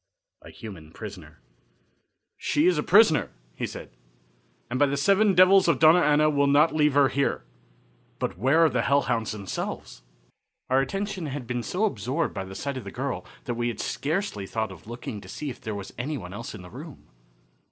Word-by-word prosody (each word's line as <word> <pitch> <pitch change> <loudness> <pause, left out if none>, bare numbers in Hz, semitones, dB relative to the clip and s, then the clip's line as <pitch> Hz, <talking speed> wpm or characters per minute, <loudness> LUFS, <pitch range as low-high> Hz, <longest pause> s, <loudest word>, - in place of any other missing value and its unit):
A - - -13
Human 95 -9 -10
Prisoner. 90 -6 -10 1.0
"She 150 +2 +1
is 180 -3 +3
a - - +2
prisoner," 195 -2 +5 0.2
he - - -3
said, - - -9 0.8
"and 125 +2 -3
by 145 - +5
the 140 +1 -1
Seven 200 +6 +3
Devils 185 +1 +6
of 170 - +3
Dona 160 +3 +6
Ana 150 0 +4
we'll 140 -2 +2
not 145 +3 +4
leave 150 -2 +2
her 140 -1 +6
here. 140 - -1 0.7
But - - -3
where 135 - +4
are - - +4
the 125 -3 0
hellhounds 120 -5 +1
themselves?" 100 - -6 0.7
Our 130 - +5
attention 195 +4 -3
had 140 -2 -5
been 120 0 -2
so 180 - -1
absorbed 155 - -2
by 95 -2 -4
the 95 0 -10
sight 140 +3 -4
of 130 - -6
the 100 - -7
girl 125 -5 -4 0.2
that 120 - -3
we 120 0 -1
had 120 -3 -4
scarcely 150 - -2
thought 110 -1 -2
of 90 +1 -13
looking 115 -3 -6
to 95 - -13
see 145 +7 -5
if - - -12
there 110 -1 -4
was 100 -1 -7
any 145 +4 -2
one 90 -4 -8
else 115 +2 -7
in 95 - -10
the 90 - -12
room. 150 +3 -11
135 Hz, 195 wpm, -26 LUFS, 110-155 Hz, 1.0 s, Devils